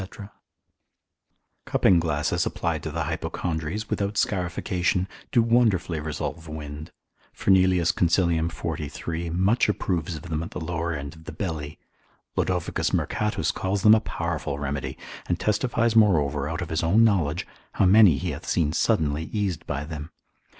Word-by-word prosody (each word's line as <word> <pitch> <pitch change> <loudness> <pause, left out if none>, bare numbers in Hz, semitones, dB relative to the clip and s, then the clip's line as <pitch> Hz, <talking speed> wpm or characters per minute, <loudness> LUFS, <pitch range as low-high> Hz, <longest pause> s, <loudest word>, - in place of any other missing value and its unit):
Cupping 90 -3 +4
glasses 75 -3 0
applied - - -2
to - - -4
the - - -2
hypochondries, 85 +5 -3
without 100 +1 -2
scarification, 90 0 0 0.2
do 120 -3 +4
wonderfully 110 -8 +2
resolve 80 +1 -4
wind. 75 0 -7 0.4
Fernelius 95 -3 +3
consil. 85 -1 +2
43. 80 +1 -4
much 95 +8 +2
approves 90 -5 -1
of 75 - -8
them 80 -3 -3
at 85 - -5
the - - -6
lower 85 +1 -2
end 70 -2 -5
of 80 0 -16
the - - -6
belly; 75 -6 -4 0.6
Lod. - - +1
Mercatus 95 +4 0
calls 95 +1 -2
them 105 - +8
a 110 - +6
powerful 85 -7 -3
remedy, 70 -1 -3 0.3
and 85 - -1
testifies 115 +2 +1
moreover 75 -9 +3
out 80 +3 -3
of 85 - -7
his 80 - 0
own 95 +8 +4
knowledge, 90 -7 +2 0.3
how - - +2
many 95 -5 +7
he - - -2
hath - - -8
seen 80 -3 +1
suddenly 80 -7 +1
eased 95 -6 -3
by 70 0 -2
them. 75 0 -7
85 Hz, 145 wpm, -25 LUFS, 80-95 Hz, 0.6 s, them